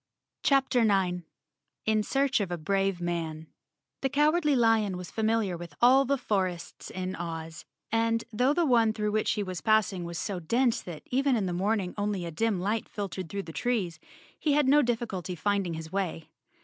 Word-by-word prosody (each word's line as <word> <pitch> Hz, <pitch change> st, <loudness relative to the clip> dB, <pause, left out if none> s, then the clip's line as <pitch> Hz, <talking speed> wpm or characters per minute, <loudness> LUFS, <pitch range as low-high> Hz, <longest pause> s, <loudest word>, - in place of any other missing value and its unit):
CHAPTER 265 Hz, -3 st, +3 dB
9 185 Hz, -5 st, +1 dB, 0.6 s
In 220 Hz, -1 st, +3 dB
Search 270 Hz, +3 st, +1 dB
of 200 Hz, -3 st, -1 dB
a 175 Hz, -, -2 dB
Brave 195 Hz, +2 st, 0 dB
Man 165 Hz, -3 st, -3 dB, 0.6 s
T 270 Hz, -, +2 dB
HE -, -, -6 dB
Cowardly 300 Hz, +2 st, +3 dB
Lion 225 Hz, -5 st, +3 dB
was 180 Hz, -1 st, -8 dB
familiar 220 Hz, -4 st, +1 dB
with 170 Hz, -3 st, -9 dB
all 260 Hz, +3 st, +6 dB
the 280 Hz, +2 st, +1 dB
for¬ 195 Hz, -7 st, 0 dB
ests 175 Hz, -1 st, -10 dB
in 185 Hz, 0 st, -4 dB
Oz, 165 Hz, -1 st, -6 dB, 0.3 s
and 230 Hz, 0 st, +1 dB
though 250 Hz, +5 st, +3 dB
the 335 Hz, +3 st, +2 dB
one 230 Hz, -5 st, +4 dB
through 210 Hz, -1 st, -1 dB
which 215 Hz, +1 st, +1 dB
he 210 Hz, -, -1 dB
was 185 Hz, -3 st, -5 dB
passing 215 Hz, -4 st, +2 dB
was 170 Hz, 0 st, -5 dB
so 190 Hz, +2 st, -3 dB
dense 235 Hz, +8 st, +1 dB
that, 170 Hz, -4 st, -8 dB
even 270 Hz, +1 st, +2 dB
in 210 Hz, -4 st, 0 dB
the 180 Hz, -, -2 dB
morning, 195 Hz, 0 st, 0 dB
only 205 Hz, -3 st, -1 dB
a 170 Hz, -, -5 dB
dim 215 Hz, +3 st, 0 dB
light 210 Hz, +4 st, -1 dB
filtered 190 Hz, -4 st, -5 dB
through 200 Hz, 0 st, -3 dB
the 165 Hz, -, -9 dB
trees, 195 Hz, -9 st, -1 dB, 0.4 s
he 300 Hz, -, +1 dB
had 295 Hz, -2 st, +3 dB
no 290 Hz, +2 st, +6 dB
difficulty 225 Hz, -, -2 dB
finding 195 Hz, -1 st, 0 dB
his 160 Hz, 0 st, -7 dB
way. 185 Hz, -5 st, -2 dB
205 Hz, 190 wpm, -28 LUFS, 180-235 Hz, 0.6 s, all